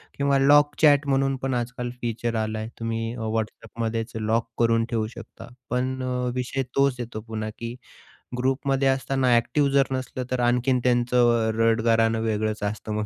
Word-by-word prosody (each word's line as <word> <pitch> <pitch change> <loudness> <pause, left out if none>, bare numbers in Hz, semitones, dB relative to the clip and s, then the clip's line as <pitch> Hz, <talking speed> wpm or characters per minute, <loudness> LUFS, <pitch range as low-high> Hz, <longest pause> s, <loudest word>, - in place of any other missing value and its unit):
किंवा 140 -1 +2
lock 145 +1 +5
chat 145 -2 +5
म्हणून 135 0 +1
पण 135 -1 0
आजकाल 120 0 -3
फीचर 115 0 -2
आला 110 0 -2
आहे. 110 - -4
तुम्ही 115 +1 -3
WhatsAppमध्येच 115 +1 -3
लॉक 110 +1 0
करून 115 -1 +3
ठेवू 110 -2 -1
शकता. 115 - -11 0.2
पण 130 +2 -1
अ, - - -3 0.3
विषय 130 +1 -2
तोच 140 -2 +3
येतो 115 -2 -5
पुन्हा, 110 -1 -4
की 115 0 -5 0.7
ग्रुपमध्ये 135 +1 +1
असताना 130 -2 +2
ॲक्टिव्ह 140 +4 +2
जर 140 -1 +3
नसलं, 130 -1 -3
तर 130 - 0
आणखीन 125 +1 +1
त्यांचं 120 -2 +3
अ, - - +1
रडगाणं 115 0 +3
वेगळंच 110 -1 -1
असतं 105 +1 -3
मग, 105 0 -1
120 Hz, 160 wpm, -25 LUFS, 115-130 Hz, 0.7 s, लॉक